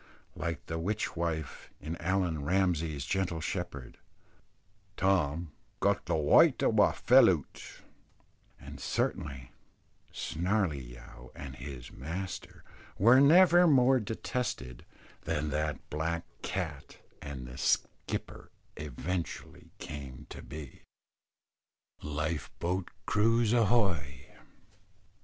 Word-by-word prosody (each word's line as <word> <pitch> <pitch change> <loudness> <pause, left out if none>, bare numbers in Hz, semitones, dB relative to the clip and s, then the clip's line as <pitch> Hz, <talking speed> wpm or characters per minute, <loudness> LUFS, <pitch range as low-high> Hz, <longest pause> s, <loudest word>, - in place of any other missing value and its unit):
Like 85 0 -4
the 80 0 -4
witch 105 +6 -2
wife 80 -4 -3
in 80 +3 -5
Allan 90 -4 0
Ramsay's 80 -4 0
Gentle 95 -3 -1
Shepherd 80 -7 -5 1.0
Tom 85 -4 +1 0.3
"Got - - +1
the - - +1
wyte 75 -2 +5
o' - - +4
a' - - +5
fell - - +6
oot;" - - -4 0.8
and - - -10
certainly 65 -2 -2 0.6
Snarley 80 - -1
yow 60 +1 -13
and 65 -3 -8
his 65 -2 -8
master 90 +8 -6 0.3
were 120 +6 +7
never 175 +4 +7
more 130 -3 +5
detested 105 - -4 0.3
than 75 -2 -2
that 75 -1 -2
black 80 +2 -2 0.2
cat, - - -4 0.2
and 65 -3 -7
the 65 +2 -9
skipper - - -2 0.3
eventually 80 +5 -5
came 70 -4 -8
to - - -8
be. 75 -4 -9 1.2
"LIFE 75 +1 -3
BOAT'S 90 +1 -2 0.2
CREW, 115 +2 +3
AHOY!" 95 - +1
80 Hz, 100 wpm, -31 LUFS, 75-95 Hz, 1.2 s, were